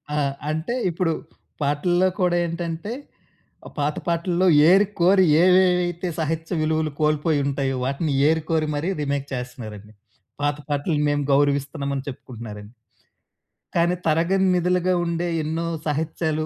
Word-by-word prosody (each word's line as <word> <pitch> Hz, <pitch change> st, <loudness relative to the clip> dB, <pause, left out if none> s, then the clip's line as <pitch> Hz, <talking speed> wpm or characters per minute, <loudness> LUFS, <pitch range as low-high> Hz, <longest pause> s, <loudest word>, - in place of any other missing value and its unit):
ఆ! -, -, 0 dB, 0.3 s
అంటే, 160 Hz, +10 st, -2 dB
ఇప్పుడు 170 Hz, 0 st, 0 dB, 0.5 s
పాటల్లో 175 Hz, +6 st, +2 dB
కూడా 180 Hz, -1 st, +2 dB
ఏంటంటే, 170 Hz, +5 st, -4 dB, 0.7 s
ఆహ్, -, -, -13 dB
పాత 145 Hz, +1 st, 0 dB
పాటల్లో 170 Hz, +2 st, +1 dB, 0.2 s
ఏరికోరి 190 Hz, -1 st, +4 dB, 0.2 s
ఏవేవైతే 180 Hz, -1 st, +3 dB
సాహిత్య 160 Hz, +2 st, -2 dB
విలువులు 155 Hz, -1 st, 0 dB
కోల్పోయుంటయో, 145 Hz, -3 st, +1 dB
వాటిని 140 Hz, +3 st, -1 dB, 0.2 s
ఏరికోరి 160 Hz, -1 st, 0 dB
మరీ 165 Hz, +6 st, -1 dB
రిమేక్ 140 Hz, -1 st, -2 dB
చేస్తన్నారండి. 110 Hz, -5 st, -7 dB, 0.5 s
పాత 145 Hz, 0 st, +1 dB
పాటల్ని 145 Hz, +1 st, 0 dB
మేము 145 Hz, 0 st, 0 dB
గౌరవిస్తున్నామని 140 Hz, -1 st, 0 dB
చెప్పుకుంటన్నారండి... 110 Hz, -4 st, -9 dB, 1.0 s
కానీ, 175 Hz, +1 st, +2 dB
తరగని 170 Hz, +5 st, +2 dB
నిధులుగా 180 Hz, +1 st, +1 dB
ఉండే 170 Hz, +1 st, -1 dB, 0.2 s
ఎన్నో 165 Hz, +2 st, -2 dB, 0.2 s
సాహిత్యాలు 155 Hz, +1 st, -1 dB
160 Hz, 110 wpm, -23 LUFS, 145-175 Hz, 1.0 s, ఏరికోరి